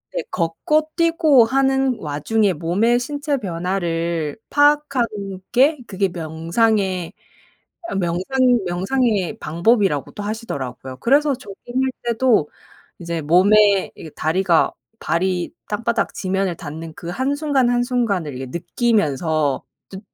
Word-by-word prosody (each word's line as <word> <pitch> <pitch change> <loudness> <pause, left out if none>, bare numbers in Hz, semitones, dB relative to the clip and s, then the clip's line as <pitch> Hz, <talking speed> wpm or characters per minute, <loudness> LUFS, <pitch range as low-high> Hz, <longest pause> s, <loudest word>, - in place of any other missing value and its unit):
네. - - 0
걷고 305 - 0
뛰고 330 -6 +4
하는 265 0 +1
와중에 185 +8 0
몸의 190 +10 +1
신체 285 +2 -2
변화를 170 - -2
파악하는 290 -4 +3 0.4
게 275 +4 +4
그게 195 0 -1
명상의 180 +3 -1 0.8
아 - - -4
명상 195 +8 +1
명상의 195 +2 0
방법이라고도 180 - +1
하시더라고요. 135 - -5
그래서 285 - +3
조깅할 250 +3 -3
때도 235 - +2 0.5
이제 170 -1 -4
몸에 195 +5 +4
이게 160 - -10
다리가 170 +2 +1 0.3
발이 180 0 -1 0.2
땅바닥 230 +2 -1
지면을 190 -2 -1
닿는 160 +2 -8
그 170 - -9
한순간, 275 - 0
한순간을 240 - 0
이렇게 130 +1 -6
느끼면서 160 - 0 0.3
좀 190 - -8
200 Hz, 260 characters per minute, -20 LUFS, 170-250 Hz, 0.8 s, 뛰고